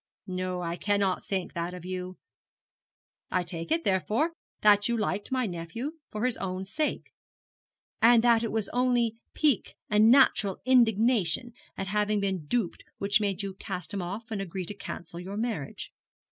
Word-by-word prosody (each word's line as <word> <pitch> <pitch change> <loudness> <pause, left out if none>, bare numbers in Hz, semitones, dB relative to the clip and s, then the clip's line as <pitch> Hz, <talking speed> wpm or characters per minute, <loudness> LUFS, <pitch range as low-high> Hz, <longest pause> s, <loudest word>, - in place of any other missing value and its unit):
No, 185 -1 -3
I 170 0 -3
cannot 200 -2 +1
think 190 -3 -2
that 170 +1 -3
of 180 -1 -9
you. 185 0 -5 1.1
I 185 - +1
take 170 - -6
it, 330 +1 +2
therefore, 210 - +1 0.3
that 205 0 +5
you 235 - +1
liked 210 0 -2
my 255 -1 +1
nephew 215 - -5
for 215 +3 -2
his 255 -2 +1
own 185 0 -3
sake; 295 +10 -2 0.9
and 235 0 +7
that 235 -2 +5
it 230 - -1
was 220 -2 -1
only 245 -2 +1 0.2
pique 295 -7 +1 0.2
and 210 +1 +6
natural 235 -7 +5
indignation 235 -3 +3 0.2
at 195 - -2
having 210 +1 +1
been 190 -6 -2
duped 225 -1 -1
which 200 +2 +2
made 200 -1 0
you 195 -1 -4
cast 185 -4 -6
him 200 - -2
off 205 +6 -6
and 205 -3 -2
agree 185 -1 -4
to 205 - -5
cancel 170 -3 -7
your 190 +3 -6
marriage. 220 - -3
205 Hz, 165 wpm, -28 LUFS, 185-230 Hz, 1.1 s, and